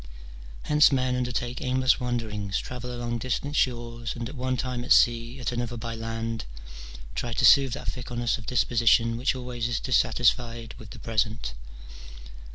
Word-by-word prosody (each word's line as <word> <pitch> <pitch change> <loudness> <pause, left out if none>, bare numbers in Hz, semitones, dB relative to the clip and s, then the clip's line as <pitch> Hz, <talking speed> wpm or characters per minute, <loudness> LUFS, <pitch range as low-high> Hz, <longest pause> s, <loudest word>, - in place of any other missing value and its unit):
Hence 150 0 +5
men 130 -2 +1
undertake 125 0 -2
aimless 130 0 +2
wanderings, 110 -5 -2
travel 125 0 -5
along 120 -1 -3
distant 130 +4 -2
shores, 120 -3 -1
and 120 -1 -4
at 130 - -8
one 130 0 -1
time 125 -1 -3
at 125 - -6
sea, 120 +2 +3
at 125 - -2
another 120 0 -3
by 115 +1 -5
land, 115 0 -4 0.7
try 120 - -3
to - - +2
soothe 135 -3 +6
that 140 - -6
fickleness 120 0 -2
of 110 - -12
disposition 115 -1 +3
which 125 +3 0
always 125 -2 -3
is 120 -2 -1
dissatisfied 120 -2 +1
with 110 -3 -11
the - - -10
present. 110 - -1
120 Hz, 160 wpm, -26 LUFS, 115-125 Hz, 0.7 s, soothe